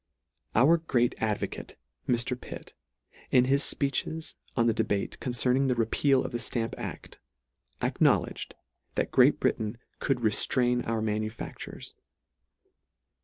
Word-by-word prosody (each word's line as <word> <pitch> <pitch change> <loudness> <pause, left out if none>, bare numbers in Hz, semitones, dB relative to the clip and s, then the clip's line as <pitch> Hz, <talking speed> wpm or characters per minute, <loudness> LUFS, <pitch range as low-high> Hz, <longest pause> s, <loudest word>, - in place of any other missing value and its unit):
Our 145 +9 +6
great 125 -7 +1
advocate, 110 -2 -3 0.3
Mr. 120 +1 +1
Pitt, 125 - -10 0.6
in 125 -1 +5
his 140 +2 +3
fpeeches 155 +3 -1 0.2
on 115 - +4
the 115 - +3
debate 100 -2 -1
concerning 125 +2 +1
the 125 - +2
repeal 130 +4 +2
of - - -4
the 120 - -2
Stamp 115 -1 -2
aff, - - -5 0.8
acknowledged, - - +1 0.4
that - - -1
Great - - +5
Britain 110 +1 0 0.2
could 135 - +1
reftrain 120 +2 +1
our 115 -1 0
manufactures. 110 0 -4
120 Hz, 120 wpm, -28 LUFS, 115-130 Hz, 0.8 s, Our